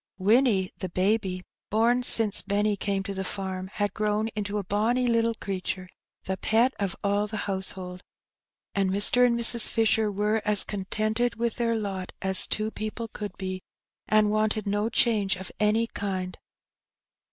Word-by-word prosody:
Winnie, 205 -1 +2
the 185 - -4
baby 185 0 0
— - - -67
born 235 +4 +2
since 225 -4 +3
Benny 205 +1 0
came 195 -1 -2
to 200 0 -5
the 190 0 -4
farm 190 -1 -4
— - - -23
had 205 -1 -1
grown 215 +1 0
into 210 -1 -4
a 205 - -2
bonny 220 +6 +1
little 230 -1 +1
creature, 185 -2 -4 0.4
the 190 0 -3
pet 230 +7 +2
of 200 -2 -2
all 205 +1 +1
the 220 +1 -5
household; 190 -2 -5 0.7
and 195 -1 +1
Mr. 205 +6 +5
and 235 -1 +3
Mrs. 235 0 +5
Fisher 220 -1 +2
were 210 +2 0
as 210 -2 +4
contented 215 +4 -2
with 235 0 -2
their 230 -1 0
lot 195 -4 -4
as 190 0 +4
two 215 +1 -2
people 220 +2 -5
could 205 -3 -7
be, 185 -1 -5 0.5
and 215 -1 +3
wanted 215 0 0
no 205 +2 0
change 215 -5 +2
of 190 0 -8
any 215 +2 +2
kind. 190 -4 -4
210 Hz, 165 wpm, -26 LUFS, 195-220 Hz, 0.7 s, Mr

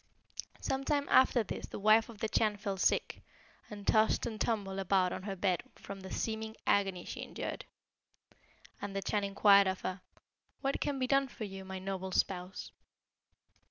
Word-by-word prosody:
"Some 270 0 -1
time 285 0 0
after 260 -2 +5
this - - -6
the - - -7
wife 215 +3 +5
of 230 - -10
the 220 - -1
Chan 215 -1 +1
fell 200 -1 -3
sick, - - +1 0.5
and 205 -2 -8
tossed 220 0 +3
and 220 -3 -5
tumbled 200 -4 -1
about 190 -1 +2
on - - -5
her 195 0 -4
bed 185 -2 +1
from 200 0 -9
the 190 0 -9
seeming 220 +2 -3
agony 195 -3 +1
she - - -6
endured. - - -5 1.2
And 200 -1 -5
the 195 - -2
Chan 205 -1 0
inquired 200 0 +6
of 190 0 -2
her, 185 0 -4 0.6
'What 275 0 -1
can 285 -1 0
be 260 - 0
done 275 +1 +3
for 240 - -8
you, 195 -2 -6
my 190 0 -6
noble 190 0 -4
spouse?' 185 0 -1
200 Hz, 175 wpm, -33 LUFS, 190-220 Hz, 1.2 s, inquired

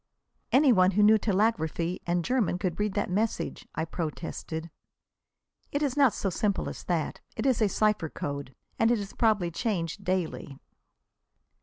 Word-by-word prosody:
"Any 270 -1 +6
one 185 -1 +4
who 210 - +6
knew 215 +1 +6
telegraphy 185 -5 0
and 175 -1 0
German 240 -9 +1
could 180 -1 -3
read 210 -2 0
that 205 - 0
message," 220 +4 -2
I 160 - -1
protested. 165 0 -5 1.0
"It 285 +1 0
is 275 -4 0
not 275 -5 +4
so 195 - -1
simple 200 +3 0
as - - -9
that. 170 -4 -1
It - - -3
is 255 -4 +2
a 210 - +4
cipher 210 -5 +1
code, 140 -3 -5 0.2
and 225 - +4
is 210 -4 -1
probably 210 -7 +2
changed 185 -1 -2
daily." 180 -7 -2
195 Hz, 155 wpm, -28 LUFS, 170-220 Hz, 1.0 s, Any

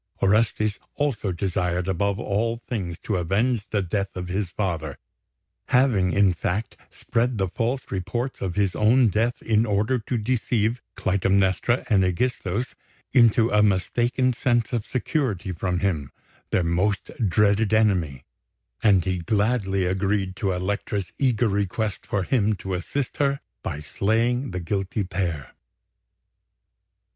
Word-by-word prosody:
Orestes 105 0 +2 0.2
also 125 -9 -1
desired 90 0 -1
above 100 +2 0
all 115 +2 -1
things 90 -8 -3
to 105 - -1
avenge 105 +7 +1
the 100 -2 0
death 100 +2 -2
of 90 -1 -5
his 95 0 -1
father 85 -7 -3 0.7
having, 120 -8 +3
in 100 -1 +4
fact, 95 +5 -3
spread 120 +1 -1
the 95 -1 +1
false 120 +8 -1
reports 120 +7 -3
of 90 -2 -2
his 100 -3 +1
own 115 +2 +4
death 115 +4 0
in 110 -1 +3
order 110 +4 +1
to 120 +3 -3
deceive 115 0 0
Clytemnestra 95 +4 +1
and 105 -5 +4
Ægisthos 100 +3 -1 0.4
into 115 -2 +5
a 105 - +4
mistaken 120 +6 +2
sense 120 0 0
of 115 -3 -1
security 125 - -1
from 90 +1 -2
him, 80 -9 -1 0.4
their 90 - +2
most 90 +4 0 0.2
dreaded 105 +2 +3
enemy; 90 -12 +2 0.6
and 95 -5 +4
he 90 -1 -1
gladly 100 0 +1
agreed 95 +1 0
to 100 -3 0
Elektra's 95 0 -2
eager 125 -4 +2
request 100 +1 -2
for 100 -2 0
him 110 -1 +1
to 95 0 -5
assist 120 +9 -3
her 140 -1 +1 0.2
by 75 - -4
slaying 115 - 0
the 90 -1 -4
guilty 95 +3 -2
pair. 90 -6 -3
100 Hz, 135 wpm, -24 LUFS, 95-115 Hz, 0.7 s, into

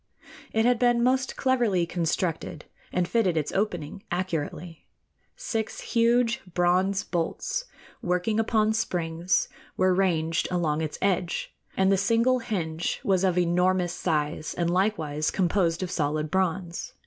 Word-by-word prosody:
It 220 0 +2
had 245 -1 +3
been 240 -1 +3
most 260 +1 +1
cleverly 240 -9 +2
constructed, 165 -2 -2 0.3
and 180 -1 0
fitted 190 -7 +1
its 150 - -1
opening 190 -3 -2
accurately. 170 -2 -4 0.5
Six 225 - -3
huge 235 +1 +2
bronze 185 +2 +2
bolts, - - -2 0.4
working 180 +5 0
upon 220 -1 +2
springs, 175 -4 0 0.3
were 185 0 +3
ranged 170 -3 +1
along 160 -4 0
its 155 -2 -3
edge, 180 -3 0 0.2
and 190 0 +4
the 195 - +4
single 230 +6 +3
hinge 175 -8 -2
was 190 -2 +2
of 185 -2 +2
enormous 180 0 +2
size 155 -3 -2
and 170 -1 0
likewise 160 -6 0
composed 175 -2 +1
of 180 - -4
solid 155 -2 -1
bronze. 185 -2 -1
180 Hz, 130 wpm, -26 LUFS, 170-220 Hz, 0.5 s, and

